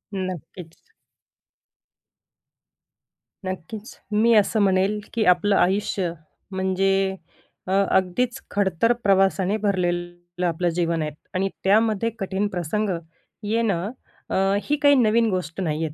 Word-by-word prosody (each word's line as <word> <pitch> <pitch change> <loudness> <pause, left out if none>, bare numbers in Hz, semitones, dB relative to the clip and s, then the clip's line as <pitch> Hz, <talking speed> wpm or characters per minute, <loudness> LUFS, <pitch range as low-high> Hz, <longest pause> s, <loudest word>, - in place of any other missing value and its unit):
नक्कीच. 180 -2 -7 2.5
नक्कीच. 190 +4 -7
मी 220 +3 +4
असं 215 +1 +3
म्हणेल, 195 +1 +2
की 230 - +1
आपलं 195 +3 0
आयुष्य 190 -1 +1 0.4
म्हणजे 190 0 +1 0.5
अ, - - -3 0.2
अगदीच 235 +8 +1
खडतर 200 +2 +2
प्रवासाने 195 -1 +3
भरलेलं 175 -2 -2
आपलं 175 +1 0
जीवन 170 -2 0
आहे. 155 0 -2 0.2
आणि 195 +1 +1
त्यामध्ये 215 +2 +3
कठीण 195 +1 -1
प्रसंग 190 +4 -2 0.5
येणं 210 -3 0 0.4
अ, - - -2 0.3
ही 295 - +1
काही 285 -1 +6
नवीन 230 -1 +3
गोष्ट 180 -3 -3
नाही 160 -2 -1
आहे. 150 - -5
190 Hz, 110 wpm, -23 LUFS, 175-210 Hz, 2.5 s, काही